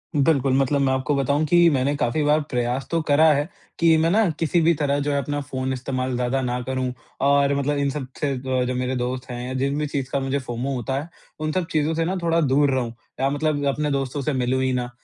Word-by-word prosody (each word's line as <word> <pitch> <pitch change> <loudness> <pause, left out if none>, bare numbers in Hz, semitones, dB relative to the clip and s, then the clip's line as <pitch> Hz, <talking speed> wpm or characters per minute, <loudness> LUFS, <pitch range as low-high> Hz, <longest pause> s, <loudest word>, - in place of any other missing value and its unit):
बिल्कुल, 140 -3 +2
मतलब 140 +1 +2
मैं 130 -1 +2
आपको 130 +2 0
बताऊँ 140 +3 +1
कि 175 +1 +5
मैंने 140 -1 +1
काफ़ी 145 0 0
बार 150 +1 +3
प्रयास 125 +1 -1
तो 165 - +2
करा 145 +2 +5
है 145 +1 0 0.3
कि 165 -1 +5
मैं 160 +1 +2
ना 215 -1 +3
किसी 165 +1 +2
भी 165 +1 +4
तरह 145 -1 +1
जो 145 +1 -1
है 140 - +1
अपना 145 +1 -2
फ़ोन 130 -1 -3
इस्तेमाल 130 0 -3
ज़्यादा 125 +2 0
ना 125 -1 -1
करूँ। 130 0 -2 0.4
और 140 0 +4
मतलब 145 +1 0
इन 140 -1 +1
सब 135 -2 -4
से 145 -2 0
अ, 130 -1 -1
जो 125 - -2
मेरे 125 +1 -1
दोस्त 125 +1 -3
हैं 125 0 -5
या 130 - -4
जिन 140 +2 -1
भी 150 - -1
चीज़ 140 -3 -3
का 140 - 0
मुझे 135 +1 -1
फोमो 125 +2 -4
होता 130 +2 -2
है 155 - -9 0.3
उन 155 0 -1
सब 185 0 -1
चीज़ों 155 +1 +1
से 165 0 0
ना 185 +2 -1
थोड़ा 165 0 +2
दूर 140 0 +3
रहूँ 125 -3 -1 0.3
या 135 +1 +2
मतलब 145 0 -1
अपने 150 +1 0
दोस्तों 135 0 -2
से 150 +2 -1
मिलूँ 130 0 0
ही 130 - +1
ना। 125 -1 -2
140 Hz, 245 wpm, -23 LUFS, 130-150 Hz, 0.4 s, कि